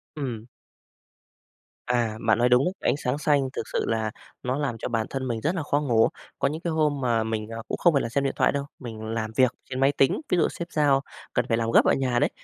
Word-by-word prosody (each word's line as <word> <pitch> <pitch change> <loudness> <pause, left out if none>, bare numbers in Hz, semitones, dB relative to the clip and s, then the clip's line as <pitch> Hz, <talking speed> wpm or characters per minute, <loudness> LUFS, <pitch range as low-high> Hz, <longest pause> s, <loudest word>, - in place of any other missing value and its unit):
Ừm. 120 -7 -4 1.4
À, 120 -3 0
bạn 110 -1 +5
nói 120 +1 +3
đúng 125 +2 +5
đấy, 180 - 0 0.2
ánh - - -1
sáng 125 0 -1
xanh 145 -3 +2
thực 110 - -4
sự - - 0
là 110 -1 0 0.3
nó 130 +2 -1
làm 135 -6 -2
cho 115 - -4
bản 115 -2 -1
thân 130 -1 -3
mình 115 -2 -2
rất 170 +5 0
là 160 - -2
khó 145 0 +1
ngủ. 115 -5 +4 0.3
Có - - +2
những 155 +3 -4
cái 170 - -2
hôm 150 -3 +1
mà 115 -3 +2
mình, 110 -1 -3
ờ, 115 0 -5
cũng - - -2
không 175 -3 +4
phải 140 - +3
là 115 - -3
xem 140 +3 0
điện 135 - 0
thoại - - +3
đâu, 140 0 -2
mình 115 -4 -7
làm 110 0 -3
việc 130 -2 +4 0.2
trên 130 0 -3
máy 135 +1 +4
tính, 135 - +2
ví 180 - +2
dụ - - +4
sếp 170 0 -7
giao 140 -3 +3 0.3
cần 125 -1 +1
phải 115 - +1
làm 115 0 0
gấp - - +6
ở - - +4
nhà 125 -3 +1
đấy, - - +3
125 Hz, 260 wpm, -26 LUFS, 115-145 Hz, 1.4 s, gấp